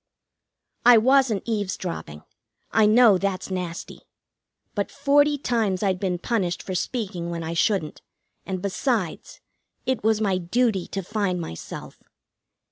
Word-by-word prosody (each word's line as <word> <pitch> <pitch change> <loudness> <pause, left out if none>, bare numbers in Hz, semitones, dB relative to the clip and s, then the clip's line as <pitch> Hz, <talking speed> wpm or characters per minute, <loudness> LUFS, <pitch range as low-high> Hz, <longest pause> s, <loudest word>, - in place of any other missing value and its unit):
I 245 -1 +8
wasn't 255 -2 +3
eavesdropping; 185 - -4 0.5
I 220 -1 +4
know 215 -3 +6
that's 195 -1 -2
nasty. 180 -2 -5 0.7
But 205 -1 -2
forty 290 +1 +3
times 220 -8 0
I'd 190 -2 +1
been 185 -2 -1
punished 180 -3 -1
for 190 - -5
speaking 185 -3 -3
when 170 -1 -4
I 160 +1 -3
shouldn't, 175 -2 0 0.4
and, 190 -1 -5
besides, 200 - -2 0.4
it 260 -4 -1
was 220 0 +3
my 195 -4 +1
duty 195 +1 0
to 195 - -4
find 200 -2 -1
myself. 120 - -8
200 Hz, 125 wpm, -24 LUFS, 180-230 Hz, 0.7 s, I